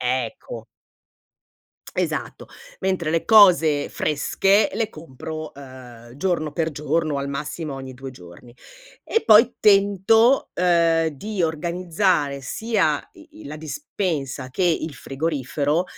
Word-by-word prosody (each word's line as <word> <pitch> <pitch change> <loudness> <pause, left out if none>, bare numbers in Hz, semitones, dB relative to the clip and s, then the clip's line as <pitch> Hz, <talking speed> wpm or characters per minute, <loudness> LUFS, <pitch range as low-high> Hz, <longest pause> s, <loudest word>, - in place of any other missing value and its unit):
Ecco 125 -2 -3 1.3
Esatto. - - -3 0.3
Mentre 185 -4 -1
le 165 0 0
cose 175 -9 +5
fresche 195 +7 +1
le 220 +1 -1
compro, 155 +1 -8
ehm, 125 -3 -13
giorno 155 -2 -1
per 165 +1 -1
giorno, 150 +1 -1
o 140 - -1
al 140 0 -4
massimo 150 +1 -5
ogni 135 -1 -8
2 135 +1 -8
giorni. 90 +2 -15 0.5
E 450 - 0
poi 225 +3 +6
tento, 205 +5 +4
ehm, 170 -2 +2
di 190 +7 -4
organizzare 170 -2 0
sia 185 - -1
i - - -16
i - - -12
la 150 +2 -7
dispensa 155 - -4
che 185 - -3
il 165 -3 0
frigorifero 145 +3 -2
155 Hz, 120 wpm, -22 LUFS, 140-185 Hz, 1.3 s, poi